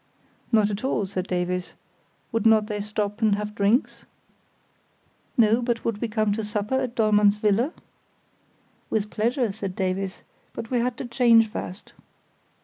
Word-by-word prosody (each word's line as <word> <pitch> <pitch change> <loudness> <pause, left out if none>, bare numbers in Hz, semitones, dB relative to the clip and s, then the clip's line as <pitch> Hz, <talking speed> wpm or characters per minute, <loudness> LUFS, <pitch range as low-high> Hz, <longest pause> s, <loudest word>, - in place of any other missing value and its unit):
Not 215 -2 +4
at 205 +3 -4
all, 240 -6 0
said 185 -1 -4
Davies; 180 0 -2 0.6
would 225 -3 0
not 220 -1 +5
they 210 -1 -3
stop 210 0 -3
and 215 -2 +4
have 210 0 -4
drinks? 210 +5 +1 1.3
No, 225 0 +4
but 235 -1 -2
would 220 -3 -2
we 235 - 0
come 215 -1 0
to 220 +1 -3
supper 210 +2 -3
at 255 -2 -3
Dollmann's 210 -2 +4
villa? 215 +7 +1 1.2
With 210 -1 -1
pleasure, 235 +1 0
said 195 -2 -5
Davies, 190 0 -2 0.3
but 225 - -7
we 245 - +2
had 240 0 -1
to - - -5
change 235 -2 +4
first. 200 -2 -7
215 Hz, 150 wpm, -25 LUFS, 205-230 Hz, 1.3 s, not